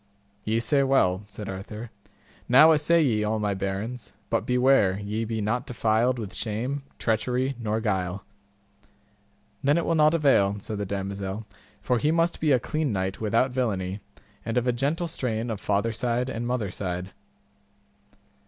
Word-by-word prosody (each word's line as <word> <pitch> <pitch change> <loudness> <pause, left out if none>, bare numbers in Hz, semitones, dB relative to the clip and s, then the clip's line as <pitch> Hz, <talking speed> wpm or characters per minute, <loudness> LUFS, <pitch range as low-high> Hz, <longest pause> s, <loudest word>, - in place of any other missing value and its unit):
Ye 110 +1 +1
say 140 +5 +2
well, 100 -9 +2
said 100 0 -8
Arthur; 105 +4 -7 0.6
now 145 +6 +8
assay 160 +2 +4
ye 110 -6 +1
all 110 +1 0
my 105 -1 0
barons; 100 +5 -4 0.2
but - - 0
beware 125 -6 +3
ye 105 +2 -3
be 110 0 -3
not 110 +4 -1
defiled 115 +1 +1
with 110 -5 -6
shame, 120 +6 -2 0.2
treachery, 125 +4 0
nor 110 -1 -1
guile. 95 -3 -1 1.4
Then 145 +3 +3
it 170 - 0
will 165 - +1
not 155 0 +4
avail, 135 -11 +3
said 105 +1 -5
the 100 - -3
damosel, 100 +1 -4 0.4
for 125 -2 +1
he 150 - +1
must 165 +1 +1
be 155 -2 +2
a 130 - +5
clean 155 +2 -1
knight 95 0 -2
without 115 +4 +2
villainy, 100 -7 -1 0.4
and 115 +2 -2
of 125 - +2
a 125 - +2
gentle 145 +8 -1
strain 120 -7 -2
of 105 - -5
father 105 +3 +1
side 120 +2 -1
and 120 0 -3
mother 120 -6 -1
side. 90 0 -4
115 Hz, 160 wpm, -26 LUFS, 100-130 Hz, 1.4 s, now